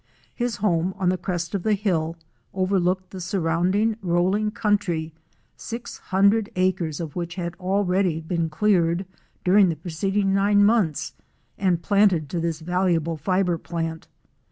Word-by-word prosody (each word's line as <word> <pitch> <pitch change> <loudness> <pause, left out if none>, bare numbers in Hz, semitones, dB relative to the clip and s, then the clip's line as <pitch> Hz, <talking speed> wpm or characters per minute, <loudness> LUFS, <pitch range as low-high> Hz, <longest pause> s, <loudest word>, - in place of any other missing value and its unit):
His 240 -2 -2
home, 185 -3 0
on 185 -2 +1
the 185 - +1
crest 175 -2 -3
of 200 - -1
the 215 +3 +2
hill, 170 -5 -1 0.4
overlooked 185 -1 0
the 190 - -7
surrounding 185 +4 +1
rolling 190 +4 +1
country, 195 -8 -1 0.4
six 230 +1 -7
hundred 200 +3 +2
acres 180 -4 0
of 160 -4 -6
which 170 -1 -4
had 170 -2 -4
already 185 -2 +1
been 165 0 -2
cleared 175 0 +1 0.4
during 190 +1 +5
the 165 - -1
preceding 195 +5 -1
nine 205 +1 +4
months 205 - +1 0.4
and 180 -3 0
planted 190 -7 +2
in 170 - 0
the 170 0 0
valuable 175 -2 +1
fibre 180 +2 0
plant. 165 -1 -4
185 Hz, 140 wpm, -24 LUFS, 170-200 Hz, 0.4 s, during